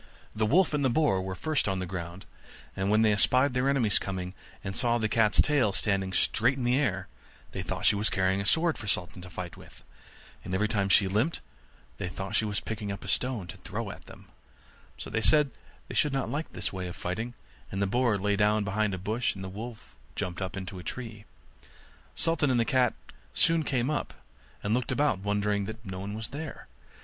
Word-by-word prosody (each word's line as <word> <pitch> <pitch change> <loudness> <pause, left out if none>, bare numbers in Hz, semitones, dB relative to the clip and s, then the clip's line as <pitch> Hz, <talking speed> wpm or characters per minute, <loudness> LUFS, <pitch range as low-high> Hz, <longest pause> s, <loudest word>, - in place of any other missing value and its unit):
The 110 0 +1
wolf 170 - +4
and 145 -1 +1
the - - +4
wild 120 - 0
boar 145 -12 +3
were 95 0 -4
first 155 +4 0
on 95 -1 0
the 95 - -2
ground; 85 0 -6 0.5
and 95 0 -1
when 110 +1 +4
they 110 - +5
espied 125 +6 +5
their 125 +2 +2
enemies 120 -7 +3
coming, 95 -1 -4 0.3
and 95 -1 -4
saw 120 -1 +2
the 110 -2 0
cat's 110 -1 +3
long - - +8
tail 140 -9 +2
standing 95 -2 +1
straight 120 +7 +3
in 130 - -3
the 120 +1 +3
air, 95 -10 0 0.4
they - - -4
thought - - -3
she - - +6
was 105 +2 +3
carrying 95 +1 +1
a - - -4
sword 165 0 +3
for 110 - -7
Sultan 90 -2 -1
to 90 - -9
fight 90 0 -7
with; - - -15 0.6
and 95 - -3
every 105 +3 +2
time 100 -3 0
she 95 0 +6
limped, 110 - +1 0.6
they 100 - -3
thought 95 +2 -5
she 110 - +3
was 105 -1 0
picking 105 -2 -4
up 100 - -6
a - - -8
stone 125 -6 0
to 85 - -9
throw - - -5
at - - -12
them; - - -13 0.7
so - - -7
they 110 - 0
said 145 +6 +4 0.4
they - - -7
should 150 - +2
not 135 -1 -1
like 150 +3 -3
this - - -3
way 95 -1 -4
of 90 - -7
fighting, 110 +7 -4 0.4
and 95 - -3
the 100 - +2
boar 120 +1 +2
lay 100 +1 +1
down 105 +1 +3
behind 100 0 0
a - - -5
bush, 110 +6 -1
and 95 - -7
the 95 - -5
wolf 110 +4 -8 0.2
jumped 90 +1 -3
up 95 +1 -3
into 95 0 -6
a - - -9
tree. 115 -3 -6 0.9
Sultan 165 -3 +1
and 125 -2 +3
the 115 - +3
cat 125 -2 +2 0.4
soon 165 0 +4
came 130 -1 0
up, 150 - -3 0.5
and 100 - 0
looked 125 +2 0
about 145 0 +2
and 95 - -11
wondered 105 -1 0
that 110 +2 -8
no 95 -1 -5
one 100 +2 -5
was 110 -1 -4
there. 150 +2 -7
105 Hz, 225 wpm, -29 LUFS, 95-125 Hz, 0.9 s, long